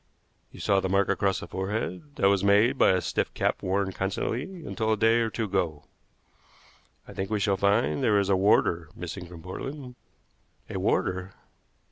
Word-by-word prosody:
You - - -13
saw 100 - +2
the 95 - -2
mark 100 +1 +2
across 100 -1 +1
the - - -7
forehead. 100 +7 -4
That 95 - +3
was 100 -1 +2
made 105 +6 +4
by - - +6
a 95 -1 +3
stiff - - -1
cap - - 0
worn 95 +1 0
constantly 125 - -3
until 110 -5 -1
a 110 - +2
day 115 +2 +4
or 115 -1 +1
two 115 - -3
ago. 90 -7 -1 1.2
I - - -10
think 95 0 -4
we 110 -1 0
shall 100 -1 +2
find 100 +8 +1
there 110 -5 +3
is 100 -1 +2
a 100 - +4
warder 85 -4 +2
missing 90 +1 -7
from 85 -2 -12
Portland." 130 - -7 0.8
"A - - -3
warder!" 95 +1 -1
100 Hz, 180 wpm, -27 LUFS, 95-110 Hz, 1.2 s, by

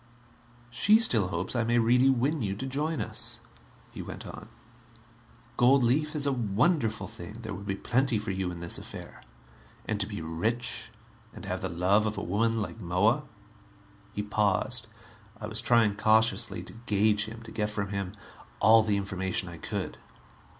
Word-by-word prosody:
"She 210 - +5
still 115 - +4
hopes 90 +5 -2
I 120 - +2
may 120 +1 +2
really 125 +3 +4
win 135 +4 +1
you 100 -3 -1
to 130 - -5
join 150 +4 -1
us," - - -4 0.5
he - - -7
went - - -8
on. - - -9 1.1
"Gold 130 +2 +5
leaf 150 +6 +1
is 145 -1 0
a 140 - +2
wonderful 115 - +1
thing; 90 +4 -9
there 110 -2 -7
would 100 +1 -8
be 95 - -1
plenty 125 +3 +1
for 105 -1 -3
you 95 -1 -2
in 85 -1 -7
this 85 - +2
affair. - - -10 0.6
And 110 -2 -2
to 100 - 0
be 105 -3 -5
rich, 110 +9 -1 0.4
and - - -9
have - - -3
the - - -2
love 95 +5 +2
of 105 - -3
a - - -3
woman 115 +4 +1
like 110 +2 -8
Moa...." 105 - +2 0.9
He 105 - -2
paused. 105 -2 0 0.5
I - - -5
was 110 +1 -1
trying 115 -4 +3
cautiously 110 0 +2
to - - -11
gauge 105 0 +3
him, 115 +1 -9
to 115 - -11
get 105 -2 -1
from 100 -2 -3
him 100 -1 -3 0.5
all 110 +1 +7
the 105 -2 +1
information 95 -2 -1
I 85 - -9
could. - - -5
110 Hz, 175 wpm, -28 LUFS, 100-120 Hz, 1.1 s, all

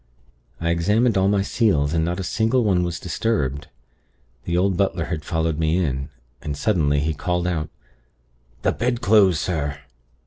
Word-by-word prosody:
I 85 0 0
examined 105 +8 +2
all 95 0 +3
my 100 -1 +2
seals, 80 -10 +1
and 80 -1 +1
not 85 +3 -2
a - - -2
single 115 +6 +1
one 95 -4 +2
was 85 -1 -3
disturbed. 75 - -2 0.8
The 85 0 0
old 95 +1 +2
butler 95 -2 0
had 80 -2 -4
followed 80 -1 -1
me 80 +1 +1
in, 70 -5 -1 0.3
and, 75 -1 -4
suddenly, 75 -4 +1
he 80 +2 0
called 90 +3 -2
out: 80 -4 -2 0.9
'The - - +3
bedclothes, 110 -6 +3
sir!' 75 -5 -2
85 Hz, 160 wpm, -22 LUFS, 80-100 Hz, 0.9 s, all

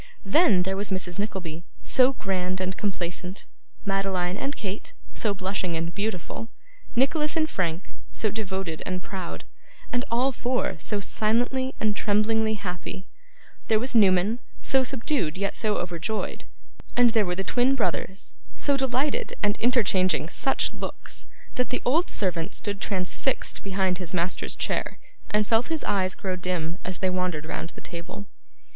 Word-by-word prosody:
Then, 200 - +5
there 190 +1 -1
was 200 +1 -1
Mrs 185 -1 -2
Nickleby, 175 -5 -3 0.2
so 260 +1 +5
grand 185 -4 -1
and 185 0 -1
complacent; 180 -2 -3 0.4
Madeline 195 -2 +1
and 275 +7 -2
Kate, 200 0 -5 0.2
so 215 - +1
blushing 185 -3 -1
and 165 +1 -2
beautiful; 210 +2 -3 0.5
Nicholas 300 +5 +2
and 315 -1 +3
Frank, 175 - -2 0.2
so 215 - 0
devoted 190 -6 -3
and 180 -1 -3
proud; 185 -3 -5 0.5
and 245 0 +2
all 250 +4 +3
four 250 0 0
so 205 +5 -1
silently 245 +6 +1
and 215 -1 +2
tremblingly 220 +1 +2
happy; 185 -1 -5 0.6
there 220 - +4
was 250 +4 -1
Newman 200 +1 +5 0.2
so 265 -1 +4
subdued 255 - 0
yet 200 +1 -1
so 215 -2 +1
overjoyed, 175 +5 -2 0.5
and 245 -1 +7
there 220 -2 +4
were 180 - 0
the 195 - -1
twin 250 +6 +3
brothers 200 -5 -1 0.2
so 285 - +2
delighted 270 +2 0
and 205 0 +3
interchanging 190 -9 +3
such 270 - +1
looks, - - -4 0.3
that 250 - +1
the 250 - -1
old 315 +8 +3
servant 180 -2 0
stood 200 -1 -2
transfixed 195 +7 0
behind 190 -2 0
his 180 0 -3
master's 175 +1 0
chair, - - -1 0.3
and 210 0 +3
felt 225 +3 +3
his 320 -2 -1
eyes 185 -2 +1
grow 190 -2 -2
dim 180 -1 -2
as 185 0 -2
they 190 - +1
wandered 180 -4 -1
round 165 - -3
the - - -10
table. 175 +4 -7
200 Hz, 150 wpm, -27 LUFS, 185-235 Hz, 0.6 s, and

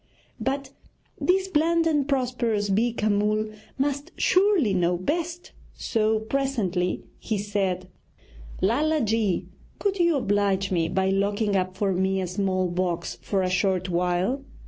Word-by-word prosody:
But 270 0 -2 0.5
this 380 +1 +2
bland 330 -1 +2
and 295 -4 +2
prosperous 240 -6 0
Beeka 220 +1 +1
Mull 215 +1 +1 0.3
must 285 +4 -1
surely 370 - +3
know 175 -1 +2
best, 335 - -3 0.2
so 220 -1 0
presently 220 -8 -1 0.2
he 220 - -2
said: 195 -3 -1 0.8
'Lala 300 +9 +2
ji, 220 -4 +1 0.3
could 395 -2 -1
you 340 -2 +4
oblige 200 -5 +1
me 165 -3 +1
by 190 +1 +1
locking 200 +1 +1
up 185 0 -1
for 195 -1 +1
me 190 +1 +1
a 185 - -1
small 185 0 0
box 170 -8 -2
for 190 +8 0
a 185 - 0
short 185 0 +1
while? 180 +9 0
205 Hz, 135 wpm, -25 LUFS, 185-275 Hz, 0.8 s, you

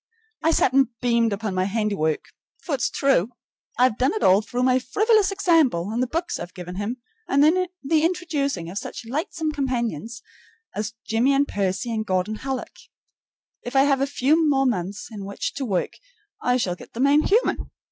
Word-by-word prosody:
I 320 - +2
sat 270 -5 +3
and 270 -1 +5
beamed 235 -2 +2
upon 200 0 -3
my 185 0 +1
handiwork, 200 -7 -1 0.4
for 330 - -3
it's 265 - +1
true, 265 -8 +2 0.5
I've 245 -2 +3
done 265 +10 +2
it 435 - -2
all 190 +3 +5
through 245 +3 -3
my 255 0 +4
frivolous 415 - +2
example 315 - +2
and 235 +3 -1
the 255 - +1
books 335 +7 -2
I've 175 - -8
given 180 0 -7
him 210 +5 -3 0.3
and 280 +1 +3
the 330 -2 +1
introducing 310 - -1
of 200 - -3
such - - -8
lightsome 310 +5 -2
companions 235 - -3 0.5
as 215 +2 -3
Jimmie 235 +5 +2
and 280 +1 +2
Percy 200 +4 -2
and 220 -1 -1
Gordon 190 +2 -1
Hallock. 265 0 -5 0.8
If 245 +2 -7
I 270 - +6
have 275 -1 +2
a 275 - +2
few 300 +3 +2
more 270 -1 +3
months 200 -4 -2
in 205 -3 -7
which 200 +1 -4
to 275 - -4
work, 195 -6 -1 0.5
I 250 0 +2
shall 190 -8 -1
get 180 - -13
the 230 - -7
man 280 +3 +5
human. 440 +9 +1
250 Hz, 185 wpm, -23 LUFS, 210-285 Hz, 0.8 s, I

